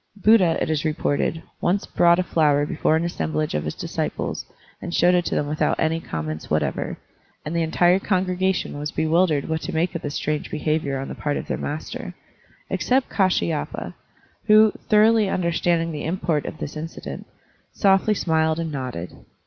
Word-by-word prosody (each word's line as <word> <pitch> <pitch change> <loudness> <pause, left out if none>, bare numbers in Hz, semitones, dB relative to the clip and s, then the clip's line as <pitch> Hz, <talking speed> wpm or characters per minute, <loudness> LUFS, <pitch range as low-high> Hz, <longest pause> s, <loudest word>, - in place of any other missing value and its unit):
Buddha, 200 -4 +4
it - - -1
is 155 -2 0
reported, 155 +1 -1 0.2
once 190 +3 +1
brought 170 0 +4
a 185 - +1
flower 150 -4 +2
before 155 0 +1
an 160 - +1
assemblage 80 - -2
of 75 0 -1
his 75 - -3
disciples - - -3 0.3
and 175 - -4
showed 175 +1 +4
it 175 -1 +2
to - - -1
them 150 - +1
without 150 +1 0
any 160 +1 +1
comments 80 - -5
what - - +2
ever, - - -3 0.5
and 155 +3 -3
the 170 - +2
entire 175 +3 +3
congregation 185 -4 0
was 150 0 -3
bewildered 160 -2 +1
what 160 0 -2
to - - -4
make 170 +2 +1
of 170 - -4
this 145 0 -4
strange 150 0 -2
behavior 155 -2 -1
on 135 +1 -4
the - - -5
part 145 -1 -2
of - - -5
their - - -2
master, 150 +2 -5 0.6
except 260 +1 +1
Kdshyapa, 185 -5 0 0.5
who, 215 0 +6 0.2
thoroughly 215 0 +5
tmderstanding 170 -2 0
the 150 -2 -5
import 165 -3 -1
of - - -6
this 145 - -6
incident, 160 +2 -7 0.4
softly 195 +1 +3
smiled 160 -3 +1
and 165 -1 -3
nodded. 125 - -5
165 Hz, 175 wpm, -23 LUFS, 150-180 Hz, 0.6 s, who